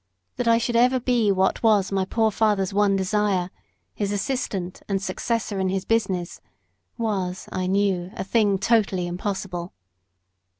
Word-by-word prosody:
That 245 Hz, -, -1 dB
I 230 Hz, 0 st, +5 dB
should 235 Hz, +1 st, -1 dB
ever 250 Hz, +2 st, +4 dB
be 240 Hz, -4 st, +2 dB
what 190 Hz, 0 st, +1 dB
was 205 Hz, -4 st, +3 dB
my 195 Hz, -1 st, +1 dB
poor 220 Hz, +2 st, +1 dB
father's 205 Hz, -3 st, +1 dB
one 200 Hz, -1 st, +3 dB
desire, 190 Hz, -2 st, 0 dB, 0.4 s
his 205 Hz, -1 st, -2 dB
assistant 200 Hz, -4 st, -3 dB
and 195 Hz, -1 st, +1 dB
successor 215 Hz, 0 st, -2 dB
in 190 Hz, -1 st, +1 dB
his 190 Hz, 0 st, -2 dB
business, 190 Hz, -6 st, -1 dB, 0.6 s
was, 190 Hz, -5 st, -2 dB
I 185 Hz, 0 st, -2 dB
knew, 190 Hz, -2 st, +1 dB
a -, -, -3 dB
thing 205 Hz, 0 st, +2 dB
totally 195 Hz, -3 st, +1 dB
impossible. 180 Hz, -1 st, -4 dB
200 Hz, 145 wpm, -24 LUFS, 190-220 Hz, 0.6 s, I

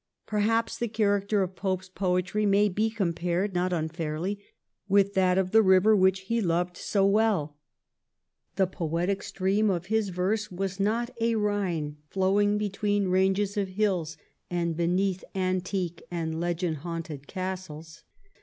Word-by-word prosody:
Perhaps 225 Hz, +2 st, 0 dB
the 235 Hz, -, 0 dB
character 205 Hz, -2 st, +1 dB
of 185 Hz, 0 st, -5 dB
Pope's 185 Hz, -1 st, -2 dB
poetry 185 Hz, +2 st, -1 dB
may 205 Hz, 0 st, +4 dB
be 215 Hz, +4 st, 0 dB
compared 180 Hz, -2 st, -1 dB
not 180 Hz, +1 st, 0 dB
unfairly 165 Hz, +3 st, -2 dB, 0.5 s
with 200 Hz, 0 st, +4 dB
that 185 Hz, -1 st, +3 dB
of 185 Hz, -1 st, +1 dB
the 225 Hz, -, +6 dB
river 190 Hz, +2 st, +5 dB
which 190 Hz, -1 st, +3 dB
he 230 Hz, +4 st, -1 dB
loved 175 Hz, -1 st, 0 dB
so 195 Hz, +1 st, +1 dB
well. 200 Hz, -8 st, +2 dB, 1.0 s
The 190 Hz, -, +3 dB
poetic 175 Hz, +2 st, -2 dB
stream 200 Hz, +2 st, 0 dB
of 175 Hz, -2 st, -1 dB
his 220 Hz, -3 st, +2 dB
verse 200 Hz, +4 st, -1 dB
was 190 Hz, +1 st, -3 dB
not 230 Hz, +5 st, 0 dB
a 230 Hz, 0 st, +2 dB
Ehine 190 Hz, -8 st, -1 dB
flowing 205 Hz, +2 st, +2 dB
between 205 Hz, -1 st, 0 dB
ranges 190 Hz, +2 st, +1 dB
of 200 Hz, -1 st, +1 dB
hills 185 Hz, -5 st, -1 dB, 0.3 s
and 170 Hz, -2 st, -1 dB
beneath 180 Hz, +3 st, 0 dB
antique 185 Hz, -2 st, -1 dB
and 160 Hz, -2 st, -3 dB
legend 170 Hz, -1 st, -1 dB
haunted 160 Hz, -3 st, -6 dB
castles. 180 Hz, -4 st, -6 dB
190 Hz, 140 wpm, -27 LUFS, 175-205 Hz, 1.0 s, the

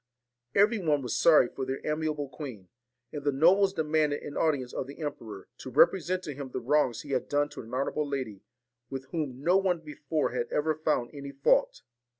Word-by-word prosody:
Every 210 Hz, +3 st, +4 dB
one 150 Hz, -6 st, +1 dB
was 120 Hz, -3 st, -2 dB
sorry 155 Hz, -6 st, +6 dB
for 135 Hz, -, -6 dB
their 130 Hz, +1 st, -3 dB
amiable 150 Hz, -1 st, -1 dB
queen; 125 Hz, -, -9 dB, 0.4 s
and 145 Hz, -2 st, -5 dB
the 145 Hz, -, +2 dB
nobles 185 Hz, +8 st, +4 dB
demanded 155 Hz, -4 st, 0 dB
an 145 Hz, -, -7 dB
audience 140 Hz, -6 st, 0 dB
of 130 Hz, -, -3 dB
the 140 Hz, -, -10 dB
emperor, 115 Hz, -10 st, -6 dB
to -, -, -7 dB
represent 185 Hz, +7 st, +3 dB
to 150 Hz, -, -5 dB
him 140 Hz, -1 st, -7 dB
the 130 Hz, -, -4 dB
wrongs 125 Hz, -2 st, +1 dB
he 145 Hz, -, -9 dB
had 130 Hz, -, -1 dB
done 145 Hz, 0 st, +1 dB
to 145 Hz, -, -8 dB
an 115 Hz, -1 st, -12 dB
honourable 140 Hz, +3 st, -1 dB
lady, 125 Hz, -8 st, -4 dB, 0.5 s
with 135 Hz, -1 st, -5 dB
whom 145 Hz, -6 st, -3 dB
no 180 Hz, +4 st, +4 dB
one 190 Hz, -2 st, +2 dB
before 150 Hz, 0 st, -2 dB
had 120 Hz, -1 st, -2 dB
ever 155 Hz, +1 st, +1 dB
found 155 Hz, -5 st, -1 dB
any 140 Hz, -1 st, -7 dB
fault. 140 Hz, 0 st, +2 dB
145 Hz, 195 wpm, -29 LUFS, 130-155 Hz, 0.5 s, sorry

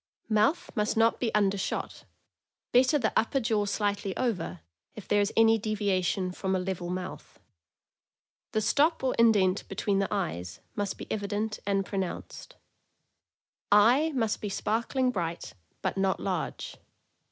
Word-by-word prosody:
Mouth 220 Hz, +10 st, +2 dB
must 210 Hz, 0 st, 0 dB
not 225 Hz, +1 st, +3 dB
be 235 Hz, -3 st, 0 dB
undershot; 200 Hz, -2 st, -1 dB, 0.7 s
better 255 Hz, +4 st, +5 dB
the 235 Hz, -6 st, 0 dB
upper 250 Hz, +4 st, +2 dB
jaw 220 Hz, -4 st, +1 dB
slightly 200 Hz, -1 st, -1 dB
over, 180 Hz, -, -2 dB, 0.3 s
if 215 Hz, -, -10 dB
there 205 Hz, 0 st, +3 dB
is 205 Hz, -, 0 dB
any 225 Hz, 0 st, +5 dB
deviation 195 Hz, -3 st, 0 dB
from 190 Hz, +1 st, -2 dB
a -, -, +1 dB
level 180 Hz, -1 st, -3 dB
mouth. 185 Hz, -, -6 dB, 1.1 s
The 215 Hz, -, +1 dB
stop 305 Hz, +8 st, +2 dB
or 260 Hz, -, +1 dB
indent 205 Hz, -5 st, +4 dB
between 195 Hz, +1 st, 0 dB
the 195 Hz, -, +1 dB
eyes 155 Hz, -, -3 dB, 0.2 s
must 205 Hz, -1 st, -2 dB
be -, -, -7 dB
evi 205 Hz, -2 st, -3 dB
dent 215 Hz, +1 st, -2 dB
and 195 Hz, -1 st, +1 dB
pronounced. 195 Hz, -, -5 dB, 1.2 s
Eye 245 Hz, +10 st, +5 dB
must 225 Hz, -4 st, 0 dB
be 210 Hz, -, -3 dB
sparkling 235 Hz, +6 st, 0 dB
bright, 170 Hz, -5 st, -4 dB, 0.3 s
but -, -, -1 dB
not 195 Hz, -1 st, +1 dB
large. 185 Hz, -4 st, -3 dB
205 Hz, 140 wpm, -28 LUFS, 190-225 Hz, 1.2 s, better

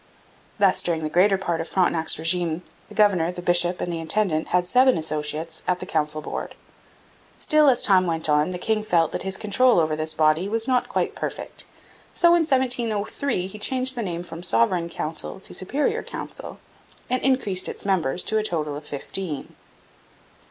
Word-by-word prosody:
Thus 200 Hz, -3 st, +4 dB
during 165 Hz, -2 st, -1 dB
the 155 Hz, -, -3 dB
greater 195 Hz, +3 st, +4 dB
part 170 Hz, -3 st, -2 dB
of 165 Hz, -, -7 dB
Frontenac's 170 Hz, -3 st, +2 dB
regime 165 Hz, +1 st, 0 dB, 0.2 s
the 210 Hz, -, -14 dB
governor, 190 Hz, -5 st, +3 dB
the 180 Hz, -, -9 dB
bishop, 175 Hz, 0 st, +3 dB
and 175 Hz, -, -3 dB
the 165 Hz, -, -3 dB
intendant 165 Hz, -1 st, 0 dB
had 180 Hz, 0 st, +1 dB
seven 255 Hz, +6 st, +4 dB
associates 155 Hz, +1 st, -3 dB
at 180 Hz, 0 st, +1 dB
the -, -, -6 dB
council 155 Hz, -3 st, -2 dB
board. -, -, -6 dB, 0.8 s
Still, 305 Hz, -2 st, +4 dB
as 250 Hz, -, +2 dB
time 185 Hz, -3 st, +4 dB
went 160 Hz, -1 st, 0 dB
on, 150 Hz, +2 st, +2 dB
the 180 Hz, -, -4 dB
king 215 Hz, +4 st, 0 dB
felt 170 Hz, -6 st, +1 dB
that -, -, -4 dB
his 190 Hz, 0 st, -2 dB
control 230 Hz, +1 st, +3 dB
over 155 Hz, -1 st, +1 dB
this 155 Hz, +1 st, -1 dB
body 155 Hz, +5 st, +2 dB
was 225 Hz, +2 st, 0 dB
not 255 Hz, -2 st, +1 dB
quite -, -, -1 dB
perfect. -, -, -5 dB, 0.5 s
So 345 Hz, -, +4 dB
in 345 Hz, 0 st, +5 dB
1703 245 Hz, -, 0 dB
he 195 Hz, +3 st, -8 dB
changed 260 Hz, +4 st, +2 dB
the 240 Hz, -, -4 dB
name 175 Hz, -4 st, -4 dB
from 170 Hz, -1 st, -9 dB
Sovereign 170 Hz, +3 st, +1 dB
Council 165 Hz, +3 st, -5 dB
to -, -, -10 dB
Superior 270 Hz, +10 st, -1 dB
Council, -, -, -7 dB, 0.5 s
and 255 Hz, +1 st, -1 dB
increased 235 Hz, -9 st, +1 dB
its -, -, -6 dB
members 180 Hz, -5 st, +1 dB
to 220 Hz, -, 0 dB
a -, -, -2 dB
total 155 Hz, -7 st, -2 dB
of 150 Hz, +1 st, -9 dB
fifteen. 150 Hz, +2 st, -5 dB
180 Hz, 180 wpm, -23 LUFS, 160-215 Hz, 0.8 s, in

